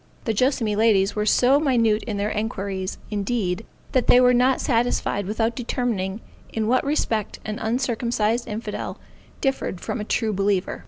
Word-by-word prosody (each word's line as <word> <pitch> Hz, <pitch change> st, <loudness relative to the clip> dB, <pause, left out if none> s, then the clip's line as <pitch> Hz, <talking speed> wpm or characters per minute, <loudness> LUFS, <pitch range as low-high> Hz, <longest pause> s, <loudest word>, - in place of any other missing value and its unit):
The 225 Hz, -, +1 dB
Joassamee 230 Hz, -2 st, +1 dB
ladies 205 Hz, -3 st, +3 dB
were 210 Hz, 0 st, -1 dB
so 260 Hz, +6 st, +4 dB
minute 230 Hz, -7 st, +2 dB
in 210 Hz, -3 st, -3 dB
their 205 Hz, +1 st, -1 dB
enquiries, 200 Hz, -3 st, -3 dB
indeed, 205 Hz, -2 st, -1 dB, 0.2 s
that 255 Hz, -2 st, +1 dB
they 245 Hz, -, +7 dB
were 250 Hz, 0 st, +5 dB
not 250 Hz, +1 st, +3 dB
satisfied 230 Hz, -5 st, 0 dB
without 225 Hz, +2 st, 0 dB
determining 225 Hz, -5 st, -2 dB, 0.3 s
in 220 Hz, -1 st, -1 dB
what 255 Hz, +2 st, +3 dB
respect 230 Hz, -7 st, -1 dB
an 215 Hz, 0 st, -4 dB
uncircumcised 235 Hz, -1 st, 0 dB
infidel 215 Hz, -1 st, -5 dB, 0.4 s
differed 270 Hz, -9 st, -1 dB
from 220 Hz, -, -4 dB
a -, -, -2 dB
true 215 Hz, 0 st, 0 dB
believer. 195 Hz, -1 st, 0 dB
220 Hz, 155 wpm, -23 LUFS, 205-245 Hz, 0.4 s, they